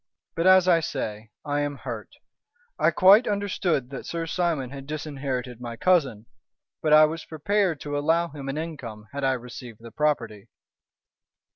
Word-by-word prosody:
"But, 165 +2 +1
as 185 -1 +6
I 170 -2 +5
say, 110 -8 -4 0.2
I 145 0 0
am 145 -1 -2
hurt. - - -7 0.6
I - - +4
quite 200 +6 +6
understood 185 -9 -1
that 135 - -7
Sir 165 -1 -3
Simon 165 -7 -1
had 135 -1 -9
disinherited 135 -5 -4
my 120 -1 -6
cousin, 135 - +2 0.6
but 155 - 0
I 155 0 +8
was 160 +1 -4
prepared 175 +1 0
to 145 -1 -4
allow 165 +4 +1
him 140 -2 -7
an 135 - -3
income 125 -10 -7
had 140 0 -5
I 135 0 +3
received 120 -2 -8
the 115 0 -11
property." 115 -9 -1
145 Hz, 160 wpm, -25 LUFS, 125-165 Hz, 0.6 s, I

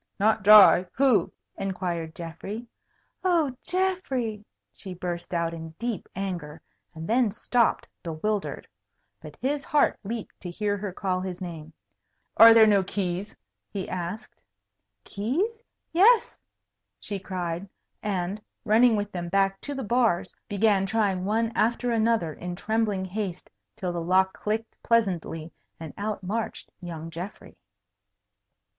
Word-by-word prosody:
"Not 220 +2 +3
dry? 200 -3 +8
Who?" 250 -9 +3 0.3
inquired 175 -4 -3
Geoffrey. 195 +7 -6 0.6
"Oh, 330 -8 +2
Geoffrey!" 275 - -1 0.3
she 190 -3 -9
burst 175 -1 -5
out 170 -1 0
in 160 -1 -8
deep 235 -5 -4
anger, 175 -6 -4 0.4
and 160 +1 -6
then 240 0 +3
stopped, 235 +3 +1
bewildered. 195 +5 -3 0.5
But - - -10
his 280 +2 -1
heart 295 - +2
leaped 225 +2 -6
to 180 - -6
hear 205 +3 -1
her 205 -1 -4
call 185 0 -2
his 185 -1 -5
name. 165 -4 -7 0.6
"Are 225 +1 +10
there 225 -1 +8
no 205 -2 +5
keys?" 190 +1 -3 0.3
he 195 -2 -4
asked. 180 +5 -6 0.6
"Keys? 360 - -2 0.3
Yes!" 430 +7 +5 0.6
she 200 -2 -5
cried, 180 -1 -4 0.3
and, 195 0 -2 0.2
running 230 +2 +5
with 205 0 -2
them 175 -2 -4
back 195 +1 +1
to 285 - -5
the 270 - -3
bars, 230 -5 +1 0.2
began 200 -1 +2
trying 200 -4 0
one 225 +3 +1
after 240 +2 +1
another 225 -8 +1
in 175 +3 -6
trembling 210 -1 0
haste 190 -2 -5 0.2
till 185 -5 -3
the 170 - -2
lock 190 +2 +3
clicked 220 +2 -3
pleasantly, 180 -8 0 0.3
and 160 -2 -8
out 205 -1 -3
marched 215 +5 -4
young 165 -2 -7
Geoffrey. 175 +5 -8
200 Hz, 130 wpm, -26 LUFS, 180-225 Hz, 0.6 s, Are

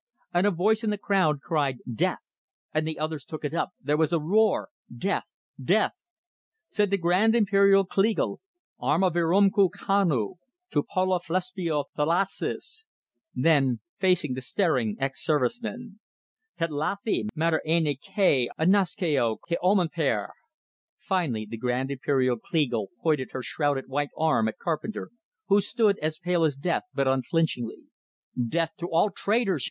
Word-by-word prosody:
And 175 +3 +3
a - - +3
voice 210 +5 +1
in 220 - 0
the 210 - -1
crowd 185 -8 +1
cried 145 -6 0 0.2
"Death!" 110 - 0 0.5
And 155 0 0
the 160 - -4
others 155 -2 -3
took 155 +1 -7
it 145 - -3
up; 170 - -1
there 145 +2 0
was 160 0 +2
a 170 - +2
roar: 210 +8 +2 0.2
"Death! - - -1 0.4
Death!" - - +3 0.8
Said 210 -2 +1
the 200 - +2
Grand 185 +6 +3
Imperial 200 -3 +4
Kleagle: 200 +4 0 0.4
"Arma 160 +9 +2
virumque 190 +4 +3
cano, 175 - 0 0.3
tou 145 - +2
poluphlesboiou 180 -3 -1
thalasses!" 190 - -1 0.5
Then, 135 -7 +3 0.2
facing 180 -7 +2
the 130 - -5
staring 130 - 0
ex 135 -1 -3
servicemen: 220 - -2 0.6
"Tetlathi 165 +8 -1
mater 160 0 +1
erne 160 -3 +2
kai 190 - +2
anaskeo 165 - +2
ko 170 - 0
omeneper!" 165 - +1 0.7
Finally 145 - -1
the 115 - -6
Grand 125 +3 -1
Imperial 130 -2 +1
Kleagle 120 - -1 0.2
pointed 150 -6 0
her 130 - -4
shrouded 145 -2 -1
white 145 +2 -1
arm 155 -8 +2
at 110 - -4
Carpenter, 170 +6 -4 0.4
who 200 +1 +4
stood, 205 0 +1
as 155 +1 -2
pale 175 0 0
as 150 -4 +2
death, 165 - -1
but 140 -1 0
unflinchingly. 130 -2 0 0.5
"Death 160 +7 0
to 175 - -4
all 175 +5 +2
traitors!" 200 -4 0
165 Hz, 135 wpm, -26 LUFS, 140-195 Hz, 0.8 s, Imperial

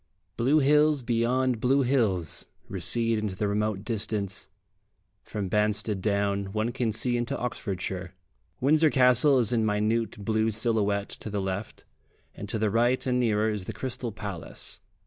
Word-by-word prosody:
Blue 135 +6 +3
hills 150 0 +4
beyond 120 +1 +1
blue 135 +4 +3
hills 110 - 0 0.2
recede 115 -2 0
into 105 -3 -3
the 105 +2 -1
remote 105 -1 -1
distance; 105 -3 -3 0.7
from 105 -3 -4
Banstead 105 0 0
Down 100 -1 0
one 110 +2 0
can 120 -2 -1
see 120 +3 0
into 120 0 -2
Oxfordshire. 95 -6 -4 0.4
Windsor 155 +4 +4
Castle 130 +1 +5
is 120 -2 +2
in 115 -2 +2
minute 110 0 0
blue 110 +1 +2
silhouette 105 -2 0
to - - -5
the 105 0 -2
left, 95 +2 -4 0.5
and 100 - -8
to 110 - -1
the 110 -1 +1
right 120 +3 +2
and 125 -1 +1
nearer 110 -2 +2
is 105 -3 -3
the - - -5
Crystal 125 -2 -4
Palace. 100 -5 -7
110 Hz, 150 wpm, -27 LUFS, 100-125 Hz, 0.7 s, Castle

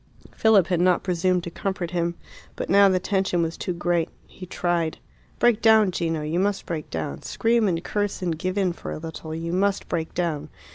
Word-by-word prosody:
Philip 215 -5 +5
had 175 -2 0
not 180 0 +3
presumed 180 0 +1
to 170 - -6
comfort 190 -2 -3
him. 170 -1 -1 0.4
But - - -4
now 200 0 +7
the 185 -1 +2
tension 190 -2 0
was 165 0 -2
too - - -3
great 175 -1 0 0.2
he 185 - -11
tried. 170 -3 -1 0.4
"Break 235 -2 +3
down, 220 -3 +5
Gino; 165 -3 -1
you 155 +3 -1
must 200 +1 0
break 160 -3 -4
down. 80 -4 -4
Scream 230 -1 +1
and 170 -2 -1
curse 205 0 -2
and 170 -2 0
give 185 +5 -3
in 190 -3 +1
for - - -7
a - - -4
little; 160 0 -7
you 165 +1 -4
must 195 +2 +1
break 160 -1 -3
down." 165 -5 -2
175 Hz, 200 wpm, -24 LUFS, 165-195 Hz, 0.4 s, now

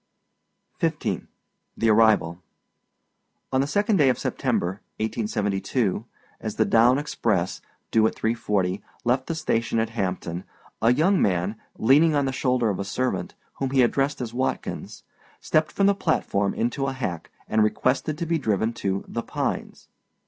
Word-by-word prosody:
F. - - +2
XV. - - -3 0.5
THE 115 - +1
ARRIVAL. 105 -6 +4 1.1
On 130 - +3
the 140 - 0
second 205 +5 +2
day 145 -5 +5
of 125 - +1
September, 95 +4 -1 0.2
1872, 105 -1 -1 0.3
as - - -4
the - - +3
down 120 +3 +5
express, 110 -11 -1 0.3
due 110 0 +4
at - - -4
3.40, 105 -4 0 0.2
left 130 +2 +1
the 165 - -2
station 115 -7 0
at 110 0 0
Hampton, 90 -4 -3 0.4
a 115 - +5
young 165 +9 +3
man, 95 +2 +1 0.2
leaning 150 +7 +5
on 140 -1 +2
the 135 - 0
shoulder 125 -4 +1
of 95 - -4
a - - -1
servant, 125 +6 -2 0.2
whom 135 - 0
he 130 -1 +4
addressed 135 +3 +1
as 120 -2 -4
Watkins, 130 +2 -3 0.4
stepped 155 0 +1
from 200 - +1
the 200 - +5
platform 100 - 0
into 135 +4 -1
a 135 - -2
hack, 95 -11 -4 0.2
and 110 - +2
requested 130 +7 0
to 170 - -2
be 165 0 0
driven 110 -2 0
to 100 -3 -2
âThe 115 - -6
Pines. - - -3
115 Hz, 155 wpm, -25 LUFS, 105-135 Hz, 1.1 s, day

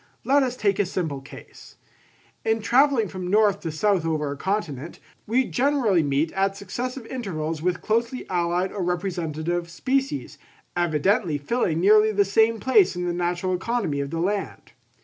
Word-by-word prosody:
Let 280 +2 +4
us 255 -2 -1
take 200 -5 0
a 205 - +3
simple 160 -7 -3
case: 135 - -14 0.7
in 225 0 +1
travelling 255 -1 +3
from 185 -1 -6
north 205 -1 +3
to 165 - -4
south 190 +2 +1
over 155 -3 -1
a - - -4
continent, 170 -4 -3 0.3
we 250 +4 +2
generally 250 - +2
meet 145 +2 0
at 195 0 0
successive 245 +6 -5
intervals 165 - -4
with 180 +1 -1
closely 230 +3 -1
allied 175 +1 0
or 200 - -4
representative 175 -2 -2
species, 270 - -2 0.4
evidently 175 0 +1
filling 165 - -1
nearly 215 +3 +5
the 200 -1 +2
same 220 +3 +3
place 260 - +4
in 180 0 -3
the 175 - -1
natural 175 +1 -1
economy 190 -6 -1
of 140 0 -3
the 165 - -4
land. 195 +3 -3
190 Hz, 160 wpm, -24 LUFS, 170-225 Hz, 0.7 s, nearly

